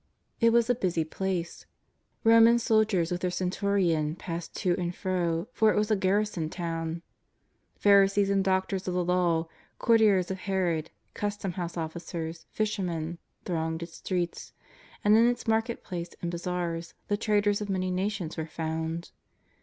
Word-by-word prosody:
'' - - -49
It 230 -1 +5
was 235 0 +4
a 245 - +4
busy 180 -8 0
place. 175 +1 -4 0.6
Roman 230 0 +7
soldiers 215 -7 +2
with 175 0 -2
their 180 - +1
centurion 180 -4 0
passed 170 -1 -6
to 180 - +1
and 175 0 -2
fro, 175 -2 -1
for 220 -1 +4
it - - -1
was 210 +1 +1
a - - +5
garrison 195 -4 0
to^vn. 165 -1 -4 0.7
Pharisees 200 0 +4
and 195 -1 +2
Doctors 190 0 0
of 180 - -1
the 180 -1 +1
Law, 175 -2 +2 0.3
courtiers 210 -6 +4
of 190 - -4
Herod, 180 -5 -1 0.2
custom 205 -2 -3
house 175 -1 -5
officers, 165 0 -5
fisher 215 -1 -1
men, 170 -2 -3 0.3
thronged 160 -1 -2
its 165 -1 -10
streets; 175 -2 -3 0.5
and 210 +1 +6
in 230 +2 +6
its 245 0 -1
market 225 +1 0
place 175 -1 -6
and 170 - -3
bazaars 170 -1 -3
the 205 - +1
traders 205 -1 +1
of 205 - -4
many 185 -1 -1
nations 185 -3 -2
were 160 0 -3
found. 160 +1 -4
180 Hz, 160 wpm, -28 LUFS, 170-205 Hz, 0.7 s, Roman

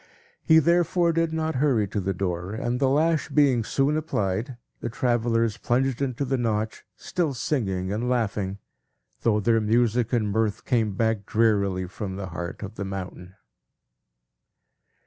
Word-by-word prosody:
He 160 - +5
therefore 170 +1 +3
did 165 0 +1
not 160 -3 -1
hurry 125 -9 +2
to 105 - -2
the 95 +1 -1
door; 90 0 -3
and 120 +2 -2
the 135 -1 +3
lash 155 +3 +2
being 135 -6 +3
soon 140 +6 +1
applied, 120 - -2 0.2
the 120 - -4
travellers 115 -2 +1
plunged 130 +1 0
into 135 0 -1
the 135 0 -1
Notch, 110 -2 -1
still 165 -7 -2
singing 100 -8 -1
and 120 +4 -2
laughing, 100 -5 -1 0.6
though 110 -2 +2
their 115 +1 +2
music 115 +1 +2
and 110 -4 +1
mirth 110 -1 -1
came 115 -5 +1
back 110 -2 0
drearily 100 -4 +2
from 95 +1 -6
the 95 -1 -5
heart 85 +4 -6
of 100 +2 -8
the 100 - -3
mountain. 95 -1 -7
115 Hz, 150 wpm, -25 LUFS, 100-135 Hz, 0.6 s, He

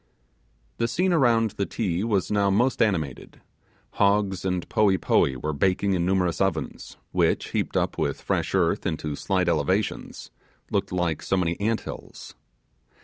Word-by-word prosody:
The 115 - +1
scene 180 +8 +1
around 115 -8 +3
the 100 - -3
Ti 95 -5 -2
was 105 -5 0
now 100 -1 +2
most 120 +6 +2
animated. 85 - -1 0.6
Hogs 100 -2 +2
and 90 -2 -2
poee 100 -3 +3
poee 70 -5 +2
were 75 +5 -3
baking 95 +6 +1
in 90 -1 0
numerous 90 -2 +1
ovens, 95 -5 -2
which, - - +1
heaped - - -1
up - - -1
with - - -1
fresh - - -1
earth - - +1
into 75 -2 -3
slight 95 +3 0
elevations, 85 +5 -1 0.4
looked - - -1
like 90 -4 -1
so 95 - 0
many 85 -2 0
ant 110 +2 0
hills. - - -9
95 Hz, 150 wpm, -25 LUFS, 85-105 Hz, 0.6 s, around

